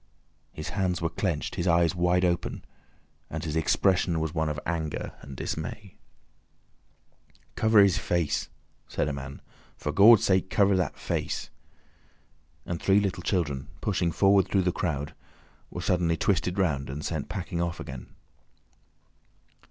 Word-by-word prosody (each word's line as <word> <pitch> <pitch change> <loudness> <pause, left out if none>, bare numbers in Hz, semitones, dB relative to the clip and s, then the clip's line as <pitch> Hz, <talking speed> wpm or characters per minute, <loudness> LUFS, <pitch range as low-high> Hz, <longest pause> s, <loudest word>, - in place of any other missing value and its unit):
His 75 - -6
hands 95 -3 -1
were 85 0 -1
clenched, 85 -3 -2
his 85 - -2
eyes 85 -1 +4
wide 90 0 +2
open, 85 -1 -2 0.6
and 80 0 -5
his 75 -2 -3
expression 85 +1 +2
was 80 -1 -2
one 80 -2 0
of 75 0 -3
anger 80 -3 -3
and 70 -2 -10
dismay. 100 +4 -5 1.6
"Cover 110 -1 +4
his 95 -3 +3
face!" 85 -4 -1 0.4
said - - -1
a 75 - -2
man. 70 0 -8 0.3
"For 75 - -3
Gawd's 105 +5 +7
sake, 95 -1 +2
cover 100 -1 +3
that 90 -5 -1
face!" - - -3 1.1
and 85 -1 -4
three 100 +1 +4
little 95 -3 -1
children, 75 -8 -1
pushing 90 -5 0
forward 95 +2 +4
through 95 -2 +2
the 90 - +2
crowd, 75 -5 -3 0.6
were - - -6
suddenly 85 -2 +1
twisted 90 +1 0
round 75 -9 0
and 75 +3 -5
sent 80 -4 -3
packing 90 -1 -3
off 85 0 -2
again. 65 -1 -7
85 Hz, 145 wpm, -27 LUFS, 80-95 Hz, 1.6 s, Gawd's